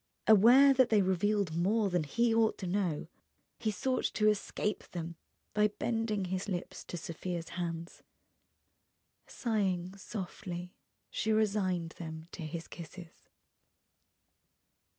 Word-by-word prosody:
Aware 245 Hz, +7 st, +8 dB
that 260 Hz, -2 st, +4 dB
they 210 Hz, -3 st, +4 dB
revealed 190 Hz, -1 st, +1 dB
more 205 Hz, +5 st, +2 dB
than 175 Hz, -3 st, +1 dB
he 235 Hz, +10 st, +2 dB
ought 225 Hz, -1 st, +3 dB
to 190 Hz, -, -5 dB
know, 180 Hz, -5 st, -1 dB, 0.5 s
he 220 Hz, -, 0 dB
sought 255 Hz, +6 st, 0 dB
to 215 Hz, -1 st, +4 dB
escape 210 Hz, 0 st, -1 dB
them 170 Hz, -1 st, -4 dB, 0.4 s
by 210 Hz, 0 st, +4 dB
bending 215 Hz, -1 st, -1 dB
his 185 Hz, +2 st, -3 dB
lips 180 Hz, -2 st, -4 dB
to 175 Hz, -, -5 dB
Sofia's 170 Hz, +1 st, -5 dB
hands. 170 Hz, -1 st, -5 dB, 1.3 s
Sighing 190 Hz, -6 st, -1 dB
softly, 180 Hz, -3 st, -6 dB, 0.4 s
she 220 Hz, -, 0 dB
resigned 195 Hz, -6 st, +1 dB
them 160 Hz, -1 st, -7 dB
to -, -, -8 dB
his 165 Hz, +1 st, -5 dB
kisses. 170 Hz, 0 st, -11 dB
190 Hz, 120 wpm, -32 LUFS, 175-215 Hz, 1.3 s, Aware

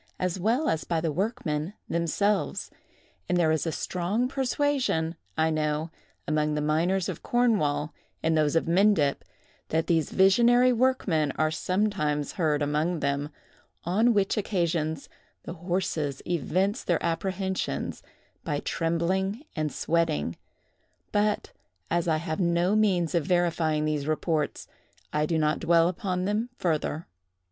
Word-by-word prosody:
as 185 Hz, 0 st, -2 dB
well 235 Hz, -, +1 dB
as 160 Hz, -, 0 dB
by 165 Hz, -, -1 dB
the 160 Hz, -1 st, -1 dB
workmen 180 Hz, -, -2 dB
themselves; 185 Hz, +5 st, 0 dB, 0.6 s
and 180 Hz, -, +2 dB
there 165 Hz, -3 st, +3 dB
is 160 Hz, +1 st, 0 dB
a -, -, 0 dB
strong 185 Hz, +10 st, -1 dB
persuasion, 260 Hz, -, 0 dB, 0.2 s
I 160 Hz, 0 st, +2 dB
know, 155 Hz, +1 st, -1 dB, 0.4 s
among 150 Hz, 0 st, +1 dB
the -, -, 0 dB
miners 170 Hz, +5 st, +1 dB
of -, -, -5 dB
Cornwall, 195 Hz, -12 st, +1 dB, 0.3 s
and 160 Hz, 0 st, +2 dB
those 155 Hz, 0 st, +2 dB
of 165 Hz, -, +2 dB
Mendip, 170 Hz, -5 st, +3 dB, 0.5 s
that 160 Hz, +1 st, +1 dB
these 165 Hz, -4 st, +1 dB
visionary 240 Hz, +6 st, +5 dB
workmen 220 Hz, -, +1 dB
are 155 Hz, 0 st, +1 dB
sometimes 160 Hz, -4 st, 0 dB
heard 155 Hz, -4 st, 0 dB
among 150 Hz, +3 st, 0 dB
them; 140 Hz, +1 st, -1 dB, 0.5 s
on 215 Hz, +8 st, +3 dB
which 200 Hz, +2 st, +1 dB
occasions 165 Hz, -7 st, -1 dB, 0.4 s
the -, -, -6 dB
horses 170 Hz, -5 st, -2 dB
evince 185 Hz, -, 0 dB
their 175 Hz, -, 0 dB
apprehensions 190 Hz, -, -2 dB, 0.4 s
by 145 Hz, -, -1 dB
trembling 190 Hz, -, -1 dB
and 155 Hz, -2 st, -1 dB
sweating; 85 Hz, -, 0 dB, 0.8 s
but 210 Hz, 0 st, 0 dB, 0.4 s
as 170 Hz, 0 st, +1 dB
I 160 Hz, -1 st, +2 dB
have 155 Hz, 0 st, -3 dB
no 175 Hz, +2 st, +2 dB
means 185 Hz, -6 st, +2 dB
of 170 Hz, -4 st, 0 dB
verifying 165 Hz, -3 st, +1 dB
these 150 Hz, -2 st, -1 dB
reports, 155 Hz, -1 st, -1 dB, 0.5 s
I 150 Hz, 0 st, +1 dB
do 165 Hz, -, 0 dB
not 155 Hz, -1 st, +1 dB
dwell 170 Hz, 0 st, +4 dB
upon 180 Hz, 0 st, -2 dB
them 215 Hz, +4 st, -1 dB
further. 160 Hz, -1 st, -1 dB
170 Hz, 135 wpm, -27 LUFS, 155-195 Hz, 0.8 s, visionary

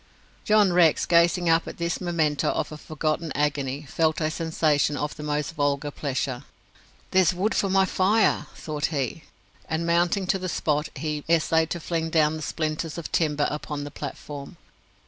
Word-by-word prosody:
John 210 Hz, -4 st, +4 dB
Rex, 170 Hz, -3 st, +4 dB
gazing 170 Hz, +1 st, +3 dB
up 165 Hz, 0 st, +3 dB
at -, -, -7 dB
this 170 Hz, +2 st, -2 dB
memento 160 Hz, -5 st, +1 dB
of -, -, -2 dB
a 155 Hz, -, -7 dB
forgotten 155 Hz, +1 st, -2 dB
agony, 140 Hz, -1 st, -1 dB
felt 160 Hz, +2 st, 0 dB
a 155 Hz, -1 st, 0 dB
sensation 155 Hz, -3 st, +1 dB
of 150 Hz, 0 st, -3 dB
the 155 Hz, -, -9 dB
most 150 Hz, +1 st, -2 dB
vulgar 145 Hz, -1 st, 0 dB
pleasure. 135 Hz, -2 st, -3 dB, 0.7 s
"There's 185 Hz, -1 st, +4 dB
wood 200 Hz, +4 st, 0 dB
for 195 Hz, -, +1 dB
my 190 Hz, 0 st, +4 dB
fire!" 205 Hz, +4 st, +2 dB
thought 150 Hz, -1 st, -2 dB
he; 140 Hz, +1 st, -3 dB, 0.4 s
and 160 Hz, +1 st, -1 dB
mounting 175 Hz, +3 st, +2 dB
to 190 Hz, +1 st, +1 dB
the 185 Hz, 0 st, -3 dB
spot, 150 Hz, -2 st, 0 dB
he 150 Hz, -2 st, -3 dB
essayed 160 Hz, 0 st, +3 dB
to 175 Hz, -, -3 dB
fling 165 Hz, 0 st, -2 dB
down 155 Hz, -1 st, +3 dB
the 155 Hz, -, -6 dB
splinters 155 Hz, +1 st, -3 dB
of 170 Hz, -, -6 dB
timber 150 Hz, -3 st, +1 dB
upon 150 Hz, -1 st, -4 dB
the 145 Hz, -, -7 dB
platform. 145 Hz, +3 st, -7 dB
160 Hz, 170 wpm, -25 LUFS, 150-170 Hz, 0.7 s, John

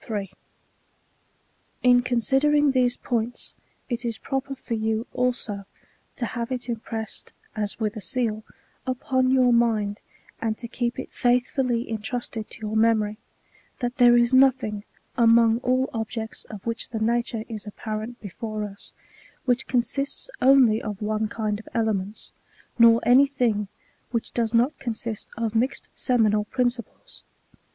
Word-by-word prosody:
582—619. 205 Hz, -4 st, -4 dB, 1.5 s
In 245 Hz, -1 st, +6 dB
considering 270 Hz, +5 st, +3 dB
these 250 Hz, -2 st, +2 dB
points, 240 Hz, 0 st, -3 dB, 0.3 s
it 240 Hz, -1 st, -3 dB
is 230 Hz, -2 st, -2 dB
proper 270 Hz, 0 st, -3 dB
for 240 Hz, -2 st, -4 dB
jou, 220 Hz, +1 st, -1 dB
also, 235 Hz, -5 st, -1 dB, 0.5 s
to 240 Hz, -, -2 dB
have 235 Hz, +1 st, -4 dB
it 255 Hz, -1 st, -1 dB
inipressed, 225 Hz, -1 st, -5 dB, 0.2 s
as 210 Hz, 0 st, -2 dB
with 215 Hz, 0 st, -1 dB
a 215 Hz, -, -6 dB
seal, 225 Hz, -3 st, 0 dB, 0.4 s
upon 255 Hz, 0 st, +1 dB
your 255 Hz, -2 st, +4 dB
mind, 215 Hz, -3 st, +2 dB, 0.4 s
and 220 Hz, -1 st, -1 dB
to 235 Hz, -, -7 dB
keep 240 Hz, 0 st, -2 dB
it 260 Hz, -, -6 dB
faithftdly 245 Hz, 0 st, +1 dB
intrusted 225 Hz, 0 st, -4 dB
to -, -, -11 dB
your 215 Hz, 0 st, -3 dB
memory, 220 Hz, -1 st, +2 dB, 0.6 s
that 245 Hz, -1 st, -3 dB
there 240 Hz, -1 st, +7 dB
is 240 Hz, +1 st, +3 dB
nothing, 255 Hz, -6 st, +3 dB, 0.4 s
among 230 Hz, 0 st, +5 dB
all 255 Hz, +1 st, +1 dB
objects 225 Hz, 0 st, -4 dB
of 210 Hz, -3 st, -10 dB
which 230 Hz, 0 st, -2 dB
the 225 Hz, -, -4 dB
nature 235 Hz, 0 st, 0 dB
is 215 Hz, -2 st, -7 dB
apparent 215 Hz, +3 st, -5 dB
before 215 Hz, +2 st, -5 dB
us, 200 Hz, -1 st, -8 dB, 0.5 s
which 250 Hz, -1 st, +1 dB
consists 270 Hz, -, -1 dB
only 255 Hz, -4 st, +6 dB
of 205 Hz, -2 st, -5 dB
one 215 Hz, +1 st, -1 dB
kind 210 Hz, -1 st, -2 dB
of 220 Hz, -, -13 dB
elements; 215 Hz, -3 st, -1 dB, 0.5 s
nor 230 Hz, 0 st, +7 dB
any 260 Hz, +3 st, +6 dB
thing, 235 Hz, -7 st, 0 dB, 0.4 s
which 230 Hz, -1 st, -3 dB
does 230 Hz, -2 st, 0 dB
not 245 Hz, +5 st, +2 dB
consist 225 Hz, -2 st, -3 dB
of 225 Hz, -2 st, -1 dB
mixed 255 Hz, +4 st, 0 dB
seminal 215 Hz, -4 st, +2 dB
principles. 250 Hz, -, -3 dB
235 Hz, 140 wpm, -25 LUFS, 220-250 Hz, 1.5 s, there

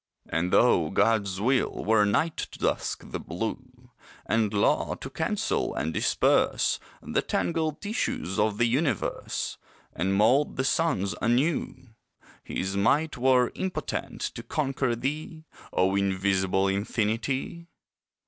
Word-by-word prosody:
And 85 Hz, +2 st, -1 dB
though -, -, +4 dB
God's 100 Hz, -4 st, +1 dB
will 130 Hz, +5 st, 0 dB
were 105 Hz, 0 st, +4 dB
night 155 Hz, +11 st, +1 dB
to -, -, -5 dB
dusk -, -, -2 dB
the -, -, -3 dB
blue, 125 Hz, +7 st, -6 dB, 0.3 s
And 110 Hz, -1 st, +1 dB
law 100 Hz, -1 st, +1 dB
to -, -, -8 dB
cancel -, -, -1 dB
and 80 Hz, +2 st, -2 dB
disperse -, -, +2 dB, 0.2 s
The -, -, 0 dB
tangled 160 Hz, -3 st, -1 dB
tissues 205 Hz, -, -2 dB
of 105 Hz, -1 st, +1 dB
the 120 Hz, -, +3 dB
universe, 130 Hz, -, -1 dB, 0.3 s
And 95 Hz, +4 st, 0 dB
mould 125 Hz, +8 st, +3 dB
the 130 Hz, -, +1 dB
suns 135 Hz, -, +1 dB
anew, 130 Hz, +2 st, 0 dB, 0.5 s
His 95 Hz, +1 st, -3 dB
might 140 Hz, +11 st, +2 dB
were 125 Hz, -1 st, +3 dB
impotent 190 Hz, -1 st, -4 dB
to -, -, -3 dB
conquer 130 Hz, -1 st, -1 dB
thee, 155 Hz, +5 st, -4 dB, 0.3 s
O 95 Hz, +1 st, +2 dB
invisible 95 Hz, 0 st, +1 dB
infinity! 115 Hz, -, -1 dB
115 Hz, 120 wpm, -27 LUFS, 100-140 Hz, 0.5 s, though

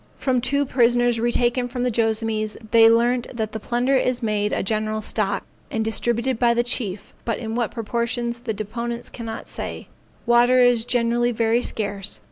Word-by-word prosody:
From 255 Hz, -2 st, 0 dB
two 280 Hz, +3 st, +1 dB
prisoners 240 Hz, -2 st, +2 dB
retaken 240 Hz, +1 st, +1 dB
from 245 Hz, 0 st, -4 dB
the 250 Hz, -, +1 dB
Joassamees, 220 Hz, -1 st, 0 dB
they 225 Hz, -1 st, +7 dB
learnt 240 Hz, +2 st, +2 dB
that 220 Hz, -2 st, -2 dB
the 220 Hz, -, -5 dB
plunder 245 Hz, +5 st, 0 dB
is 255 Hz, -1 st, +1 dB
made 210 Hz, -1 st, 0 dB
a -, -, -1 dB
general 215 Hz, +1 st, -1 dB
stock, 205 Hz, -2 st, -1 dB, 0.2 s
and 220 Hz, -1 st, -2 dB
distributed 235 Hz, +2 st, 0 dB
by 235 Hz, -1 st, +3 dB
the 240 Hz, -, +2 dB
chief, 215 Hz, -5 st, -3 dB
but 230 Hz, -3 st, -2 dB
in 225 Hz, -2 st, -5 dB
what 235 Hz, -1 st, 0 dB
proportions 235 Hz, +1 st, -2 dB
the 235 Hz, -2 st, -3 dB
deponents 235 Hz, +3 st, -5 dB
cannot 230 Hz, -2 st, -7 dB
say; -, -, -6 dB, 0.4 s
water 240 Hz, +1 st, +4 dB
is 245 Hz, -2 st, +4 dB
generally 240 Hz, 0 st, +1 dB
very 230 Hz, +1 st, +1 dB
scarce. 205 Hz, -3 st, -2 dB
235 Hz, 170 wpm, -22 LUFS, 220-245 Hz, 0.4 s, they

